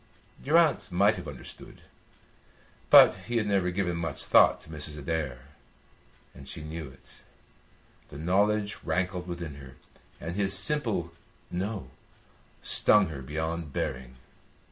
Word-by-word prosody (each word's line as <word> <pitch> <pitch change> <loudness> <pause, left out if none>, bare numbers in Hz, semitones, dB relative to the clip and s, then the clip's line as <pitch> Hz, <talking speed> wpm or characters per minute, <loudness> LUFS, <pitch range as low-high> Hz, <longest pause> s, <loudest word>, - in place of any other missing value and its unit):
Durrance 160 +1 +3
might 100 +4 +3
have 90 - -8
understood, 70 -3 -10 1.1
but - - +9
he 120 0 -1
had 110 - +1
never 100 -3 +1
given 90 -2 -2
much 80 -3 -2
thought - - +5
to - - -17
Mrs. 75 -1 -5
Adair, 70 -3 -4 0.8
and - - -13
she 75 - -6
knew 80 0 -6
it. 65 - -16 0.9
The 70 - -11
knowledge 100 +5 +1
rankled 90 +2 -2
within 85 -5 -6
her, 70 -1 -12 0.4
and 85 +2 -6
his 95 -1 +2
simple 105 - -1 0.4
"no" 95 - -4 0.7
stung 105 -4 +5
her 70 -4 -7
beyond 80 +2 -4
bearing. 65 0 -4
85 Hz, 125 wpm, -28 LUFS, 75-100 Hz, 1.1 s, but